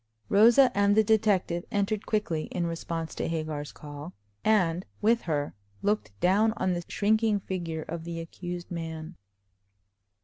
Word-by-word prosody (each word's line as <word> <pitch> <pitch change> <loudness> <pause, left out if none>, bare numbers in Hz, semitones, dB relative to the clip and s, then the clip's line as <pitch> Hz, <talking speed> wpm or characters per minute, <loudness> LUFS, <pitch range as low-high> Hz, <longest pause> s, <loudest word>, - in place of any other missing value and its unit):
Rosa 240 +5 +6
and 200 +1 +3
the 220 - +7
detective 200 -5 +2
entered 205 -1 -1
quickly 175 -8 0
in 175 -1 -2
response 165 -1 -4
to - - -2
Hagar's 155 -3 -3
call, 145 +3 -9 0.3
and 180 -5 +2 0.2
with 230 +2 +3
her 145 -3 -2 0.3
looked 205 - -1
down 210 +5 +3
on 185 -4 0
the 175 0 -3
shrinking 215 0 +2
figure 170 -5 -4
of 165 0 -6
the 170 0 -5
accused 175 +1 -7
man. 165 0 -5
180 Hz, 140 wpm, -28 LUFS, 165-210 Hz, 0.3 s, the